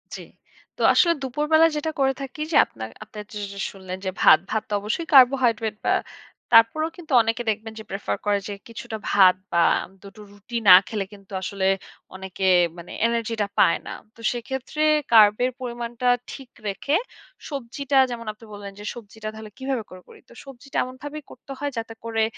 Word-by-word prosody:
জ্বী। -, -, -8 dB, 0.5 s
তো -, -, -7 dB
আসলে 340 Hz, -1 st, +4 dB
দুপুরবেলায় 300 Hz, +5 st, +3 dB
যেটা 315 Hz, +2 st, -2 dB
করে 270 Hz, 0 st, +3 dB
থাকি, 270 Hz, +2 st, -7 dB
যে -, -, -1 dB
আপনার 110 Hz, 0 st, -8 dB
আপনার 215 Hz, 0 st, -9 dB
যেস 205 Hz, -1 st, -5 dB, 0.2 s
শুনলেন 185 Hz, -1 st, -8 dB
যে 190 Hz, -, -1 dB
ভাত। 155 Hz, -, +8 dB
ভাত 220 Hz, -1 st, -1 dB
তো -, -, -4 dB
অবশ্যই 220 Hz, +11 st, -3 dB
কার্বোহাইড্রেট 245 Hz, -5 st, +5 dB
বা -, -, +3 dB, 0.6 s
তারপরেও 230 Hz, +8 st, +5 dB
কিন্তু 320 Hz, -5 st, -7 dB
অনেকে 225 Hz, +2 st, -1 dB
দেখবেন 220 Hz, +1 st, -3 dB
যে -, -, -8 dB
প্রেফার 195 Hz, +1 st, -3 dB
করে 205 Hz, -1 st, +2 dB
যে 205 Hz, -, -4 dB
কিছুটা 225 Hz, -1 st, -7 dB
ভাত 185 Hz, -2 st, +6 dB, 0.2 s
বা 170 Hz, -, +4 dB, 0.4 s
২ 200 Hz, -, -12 dB
টো 215 Hz, -, -12 dB
রুটি 205 Hz, +4 st, -7 dB
না 180 Hz, -, +12 dB
খেলে 210 Hz, -3 st, -3 dB
কিন্তু 200 Hz, -1 st, -16 dB
আসলে 190 Hz, 0 st, -2 dB, 0.5 s
অনেকে 190 Hz, 0 st, -3 dB, 0.3 s
মানে 170 Hz, 0 st, -10 dB, 0.2 s
এনার্জিটা 230 Hz, -2 st, -1 dB
পায় 170 Hz, -, +4 dB
না। -, -, -5 dB, 0.2 s
তো 230 Hz, -, -15 dB
সেক্ষেত্রে 265 Hz, +4 st, -5 dB, 0.3 s
কার্বের 220 Hz, +3 st, +6 dB
পরিমাণটা 240 Hz, 0 st, -4 dB, 0.2 s
ঠিক 265 Hz, -3 st, -10 dB, 0.2 s
রেখে, 240 Hz, +9 st, -1 dB, 0.5 s
সবজিটা 275 Hz, +1 st, -2 dB
যেমন 230 Hz, -1 st, -6 dB
আপনি 220 Hz, +2 st, -17 dB
বললেন, 205 Hz, -1 st, -8 dB
যে -, -, -9 dB
সবজিটা 220 Hz, -1 st, -10 dB
তাহলে 220 Hz, -1 st, -10 dB
কীভাবে 265 Hz, -3 st, -2 dB
করে 185 Hz, 0 st, -12 dB
করি? -, -, -16 dB
তো -, -, -15 dB
সবজিটা 275 Hz, 0 st, -9 dB
এমনভাবে 260 Hz, +4 st, -8 dB
করতে 255 Hz, -, -13 dB
হয় 290 Hz, -1 st, -2 dB
যাতে 225 Hz, 0 st, -4 dB
করে 225 Hz, -1 st, 0 dB
230 Hz, 175 wpm, -23 LUFS, 205-265 Hz, 0.6 s, না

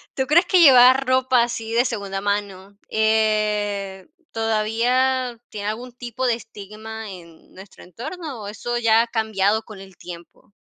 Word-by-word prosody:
¿tú 265 Hz, -1 st, -1 dB
crees 340 Hz, +4 st, +4 dB
que 365 Hz, -1 st, +3 dB
llevar 260 Hz, -2 st, +7 dB
ropa 255 Hz, -1 st, +3 dB
así 230 Hz, -1 st, -3 dB
de 240 Hz, +2 st, +3 dB
segunda 200 Hz, -4 st, -4 dB
mano, 200 Hz, -1 st, -4 dB
eh, 210 Hz, -3 st, 0 dB, 0.2 s
todavía 235 Hz, +3 st, 0 dB
tiene 205 Hz, -1 st, -5 dB
algún 240 Hz, +3 st, -6 dB
tipo 245 Hz, +1 st, -4 dB
de 235 Hz, -, +2 dB
estigma 220 Hz, 0 st, -10 dB
en 170 Hz, -3 st, -14 dB
nuestro 190 Hz, +1 st, -14 dB
entorno, 275 Hz, -, -8 dB
o, -, -, -7 dB
eso 240 Hz, +3 st, -4 dB
ya 225 Hz, -1 st, +4 dB
ha 235 Hz, -, -2 dB
cambiado 220 Hz, -1 st, 0 dB
con 215 Hz, -3 st, -12 dB
el 190 Hz, -2 st, -15 dB
tiempo? 175 Hz, +3 st, -12 dB
220 Hz, 150 wpm, -22 LUFS, 205-245 Hz, 0.2 s, llevar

